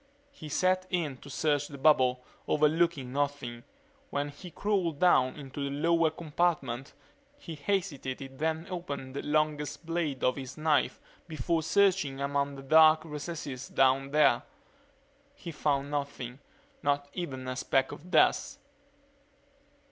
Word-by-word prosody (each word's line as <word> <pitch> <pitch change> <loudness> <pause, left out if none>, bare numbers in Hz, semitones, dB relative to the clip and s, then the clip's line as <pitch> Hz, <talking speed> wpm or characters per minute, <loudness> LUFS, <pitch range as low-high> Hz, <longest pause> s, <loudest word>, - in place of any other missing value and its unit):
He 155 - -10
set 185 +4 +1
in 160 -7 -1
to 140 - -13
search 145 0 0
the 140 - -9
bubble, 130 -3 +3 0.2
overlooking 150 -3 +2
nothing. 140 -4 -2 0.5
When 145 0 -2
he 160 +6 -10
crawled 180 -4 -1
down 135 -7 +4
into 140 -1 -6
the 140 - -2
lower 165 +3 +2
compartment 155 -5 -1 0.4
he 170 - -8
hesitated 145 -6 -3
then 160 +1 -1
opened 140 -7 -5
the - - -2
longest 155 +1 -1
blade 165 -5 -2
of 125 - +2
his 130 -2 -7
knife 155 -1 +1 0.3
before 160 +1 -1
searching 180 -6 +2
among 140 0 -1
the 135 - -9
dark 155 +2 +6
recesses 150 -4 -6
down 135 +1 +2
there. 150 +1 +4 0.9
He 180 -12 -8
found 145 -2 -1
nothing, 140 -3 -4 0.4
not 145 0 0
even 135 -8 -5
a 130 - -3
speck 130 +1 +1
of 175 +6 -10
dust. - - +3
145 Hz, 135 wpm, -30 LUFS, 135-165 Hz, 0.9 s, dark